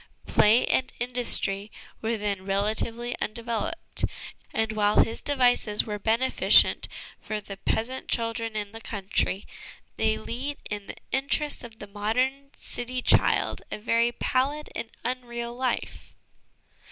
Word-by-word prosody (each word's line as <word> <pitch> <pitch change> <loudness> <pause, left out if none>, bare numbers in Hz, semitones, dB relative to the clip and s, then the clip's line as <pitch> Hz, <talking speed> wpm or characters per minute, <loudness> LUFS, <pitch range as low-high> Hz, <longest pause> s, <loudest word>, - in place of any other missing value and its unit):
Play 220 +4 +5
and 260 - +1
industry 235 -4 +1 0.3
were 225 +1 0
then 205 -2 -2
relatively 220 +5 +1
undeveloped; 235 +8 -2 0.5
and 220 0 0
while 210 -1 +4
his 225 - -5
devices 245 -6 +3
were 210 -1 -4
beneficent 230 +5 +4 0.3
for 215 -1 -4
the 200 -1 -9
peasant 245 +6 -2
children 230 -1 -1
in 205 -1 -3
the 225 0 -9
country, 200 -2 -1 0.5
they 220 0 +2
lead 255 +6 -4
in 205 -1 -4
the - - -7
interests 280 +2 0
of 230 -2 -10
the - - -8
modern 250 +7 -1
city 250 +1 -4
child - - +3
a - - -4
very 230 +2 +2
pallid 275 +5 -1
and 230 0 -4
unreal 240 -1 -3
life." 255 -1 -3
230 Hz, 130 wpm, -27 LUFS, 210-250 Hz, 0.5 s, Play